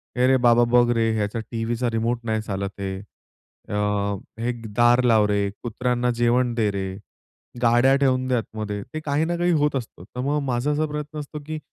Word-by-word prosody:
"ए 125 0 +3
रे 130 0 +5
बाबा, 120 -1 +5
बघ 120 -1 +5
रे, 115 -1 +2
ह्याचा 105 +1 -1
टीव्हीचा 115 +1 -1
रिमोट 115 +1 -1
नाही 110 -1 0
चालत 100 -2 -3
आहे." 95 -1 -3
अ, 100 0 -16 0.7
"हे 120 +1 0 0.2
दार 120 +1 +5
लाव 110 -3 +4
रे," 100 -1 +1
"कुत्र्यांना 125 +1 0
जेवण 120 +1 +2
दे 110 -3 +2
रे," 95 -1 -3 0.7
"गाड्या 120 +3 +5
ठेवून 130 -2 +1
द्या 125 -1 +2
आतमध्ये." 105 -2 -4
ते 155 - -3
काही 145 +2 +1
ना 175 +1 -1
काही 175 0 +2
होत 150 -1 +1
असतं. 115 -8 -5
तर 115 +5 -10
मग 145 +3 0
माझा 125 +3 0
असा 150 +1 +1
प्रयत्न 150 0 -5
असतो 150 +1 -7
की 155 0 -4
120 Hz, 190 wpm, -23 LUFS, 110-130 Hz, 0.7 s, रे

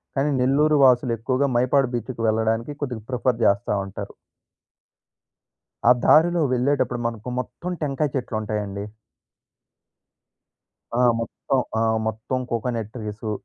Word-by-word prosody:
కానీ 140 +2 +1
నెల్లూరు 150 +4 +3
వాసులు 125 -1 +4
ఎక్కువగా 130 +4 0
మైపాడు 130 +1 +2
బీచ్‌కి 120 0 -5
వెళ్ళడానికి 110 +4 0
కొద్దిగా 125 -6 -4
ప్రిఫర్ 125 -2 0
జేస్తా 100 +1 +2
ఉంటారు. 95 - -7 1.8
ఆ - - +8
దారిలో 170 +2 +5
వెళ్ళేటప్పుడు 125 -1 0
మనకు 115 0 -5
మొత్తం 175 +8 -5
టెంకాయ 140 0 -1
చెట్లు 125 -4 -2
ఉంటాయండి. 105 -2 -4 2.1
ఆ! - - +3 0.2
మొత్తం. 130 +3 -2 0.2
ఆ! - - +1 0.3
మొత్తం 110 +4 -2
కోకోనట్ 115 -2 -2
ట్రీసు 105 -2 -5
125 Hz, 110 wpm, -23 LUFS, 110-135 Hz, 2.1 s, ఆ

